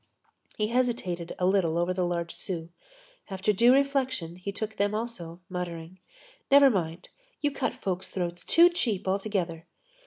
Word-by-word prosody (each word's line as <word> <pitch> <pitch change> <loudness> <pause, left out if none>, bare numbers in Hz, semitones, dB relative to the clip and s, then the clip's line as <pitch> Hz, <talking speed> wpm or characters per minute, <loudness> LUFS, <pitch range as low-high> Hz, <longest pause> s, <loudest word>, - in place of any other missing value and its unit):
He 215 0 0
hesitated 230 -9 -1
a 180 - 0
little 180 -4 +2
over 175 +1 +1
the 185 - -2
large 170 -1 -2
sous. 170 -4 -5 0.6
After 195 +2 0
due 235 +5 +5
reflection, 260 -10 +1
he 185 +2 -5
took 220 +2 -5
them 205 +1 +1
also, 180 -7 -5
muttering: 180 -1 -6 0.5
"Never 280 -1 +7
mind! 170 -3 -3 0.3
You 290 - +1
cut 265 -3 -2
folks' 185 -1 -3
throats 175 -1 -4
too 340 +1 +6
cheap 225 - -1
altogether." 190 -4 -1
190 Hz, 150 wpm, -28 LUFS, 175-235 Hz, 0.6 s, Never